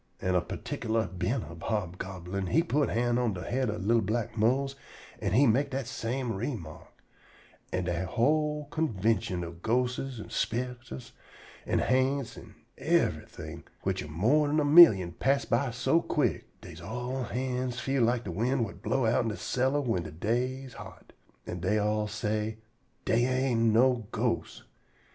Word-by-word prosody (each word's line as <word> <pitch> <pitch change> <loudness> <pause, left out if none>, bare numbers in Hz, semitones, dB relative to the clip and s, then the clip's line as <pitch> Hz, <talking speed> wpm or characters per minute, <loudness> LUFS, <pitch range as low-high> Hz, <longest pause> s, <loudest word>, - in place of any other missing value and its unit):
An' 95 - 0
a 90 - +3
perticklar 110 +5 -2
bent 115 +7 -1
up 85 0 -10
hobgoblin 95 -2 -3
he 165 - +3
put 150 -4 +1
hand 120 +1 +1
on 120 -4 +1
de 90 - -6
head 130 -1 -1
ob 105 -2 -4
li'l 115 +1 +4
black 110 +2 -2
Mose, 130 +5 +1 0.4
an' - - -1
he 135 +6 +6
mek 130 +4 +3
dat 135 -1 -3
same 125 +1 -3
_re_mark, 100 - -5 0.8
and 90 -1 -1
dat 90 +1 -1
whole 150 - +1
convintion 110 - 0
ob 85 0 -8
ghostes 125 +2 -1
an' - - -9
spicters 120 - -3 0.6
an' - - +1
ha'nts 130 0 +1
an' - - -13 0.2
yever - - +2
thing, 80 +1 -9 0.2
which - - -1
am 75 - -8
more 135 - +3
'n 150 +2 +2
a 150 - +2
millium, 145 - +8
pass 135 +10 +1
by 125 +3 +1
so 125 +8 +2
quick - - 0
dey - - -10
all's 125 +2 -4
hands 125 0 -2
feel 135 0 0
lak 120 +1 +2
de 95 - -5
wind 120 +7 0
whut 100 - -10
blow 135 -3 0
outen 115 +1 +2
de 105 - -4
cellar 130 +3 0
whin 115 -9 0
de 80 - -7
day 125 - -1
am 130 - -10
hot, - - -12 0.3
an' 90 - -5
dey 95 +5 +1
all 105 0 +1
say, 110 0 -2 0.5
"Dey 120 +2 +3
ain't 130 -3 +2
no 120 -1 +3
ghosts." - - -2
120 Hz, 165 wpm, -29 LUFS, 105-130 Hz, 0.8 s, millium